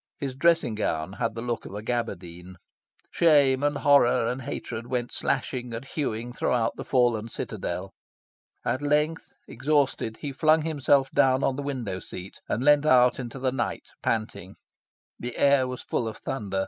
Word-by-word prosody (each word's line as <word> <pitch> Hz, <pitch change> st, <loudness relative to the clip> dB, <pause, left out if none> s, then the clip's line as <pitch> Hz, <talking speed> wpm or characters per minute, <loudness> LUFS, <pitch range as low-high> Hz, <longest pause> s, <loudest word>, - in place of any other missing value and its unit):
His 135 Hz, -2 st, -4 dB
dressing 165 Hz, -4 st, +3 dB
gown 90 Hz, -4 st, -2 dB
had 115 Hz, +1 st, -2 dB
the 115 Hz, -, -5 dB
look 120 Hz, -2 st, -2 dB
of -, -, -9 dB
a 105 Hz, -, -6 dB
gabardine. 95 Hz, -7 st, -4 dB, 0.6 s
Shame 140 Hz, -5 st, +4 dB
and 145 Hz, 0 st, +1 dB
horror 140 Hz, -5 st, +4 dB
and 130 Hz, +2 st, -5 dB
hatred 120 Hz, -3 st, -5 dB
went 120 Hz, -1 st, -2 dB
slashing 125 Hz, -3 st, -2 dB
and 120 Hz, +4 st, -6 dB
hewing 120 Hz, -5 st, -3 dB
throughout 120 Hz, -1 st, 0 dB
the -, -, -6 dB
fallen 120 Hz, -4 st, +1 dB
citadel. 95 Hz, -3 st, -4 dB, 0.7 s
At 130 Hz, -, 0 dB
length, 150 Hz, +2 st, +1 dB, 0.2 s
exhausted, 140 Hz, -6 st, 0 dB
he 145 Hz, -, -5 dB
flung 155 Hz, +3 st, +3 dB
himself 140 Hz, -3 st, +2 dB
down 135 Hz, -1 st, +3 dB
on 135 Hz, -, +1 dB
the 145 Hz, -, -4 dB
window 125 Hz, -10 st, -3 dB
seat 95 Hz, +1 st, -9 dB
and 120 Hz, -, -1 dB
leaned 145 Hz, +1 st, +5 dB
out 125 Hz, -3 st, +5 dB
into 125 Hz, 0 st, -6 dB
the 130 Hz, -1 st, 0 dB
night, 135 Hz, -, -3 dB
panting. 110 Hz, -1 st, -2 dB, 0.6 s
The 120 Hz, 0 st, -6 dB
air 140 Hz, -2 st, +4 dB
was 125 Hz, 0 st, -6 dB
full 115 Hz, -, -1 dB
of 110 Hz, -, -6 dB
thunder. 100 Hz, -6 st, -3 dB
125 Hz, 165 wpm, -26 LUFS, 115-140 Hz, 0.7 s, leaned